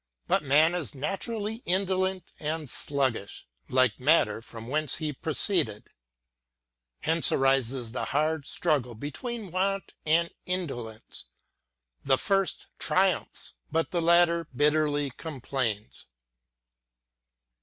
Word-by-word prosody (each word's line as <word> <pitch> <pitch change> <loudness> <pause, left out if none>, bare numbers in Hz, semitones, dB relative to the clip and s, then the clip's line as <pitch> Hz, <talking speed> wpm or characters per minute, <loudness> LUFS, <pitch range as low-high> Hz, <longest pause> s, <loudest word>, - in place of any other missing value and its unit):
But - - +3
man 155 +4 +4
is 165 -4 -3
naturally 210 - -3
indolent 190 0 0
and 155 0 -3
sluggish, 130 -6 -1 0.2
like 130 -4 +3
matter 125 -6 +3
from 115 0 -10
whence 150 +1 0
he 155 -2 -3
pro 155 +4 -3
ceeded. 135 - +1 1.2
Hence 165 +1 +2
arises 135 -3 +1
the 125 - -2
hard 155 0 0
struggle 140 -8 0
between 200 - -5
want 195 +2 -1
and 165 +2 +2
indolence: 120 - -5 0.8
the 135 -1 +3
first 195 +3 +1
triumphs, - - +1 0.2
but 165 +1 0
the 175 - 0
latter 170 0 +4
bitterly 145 0 +2
com 150 +1 -7
plains. 115 -5 -3
150 Hz, 110 wpm, -28 LUFS, 130-175 Hz, 1.2 s, man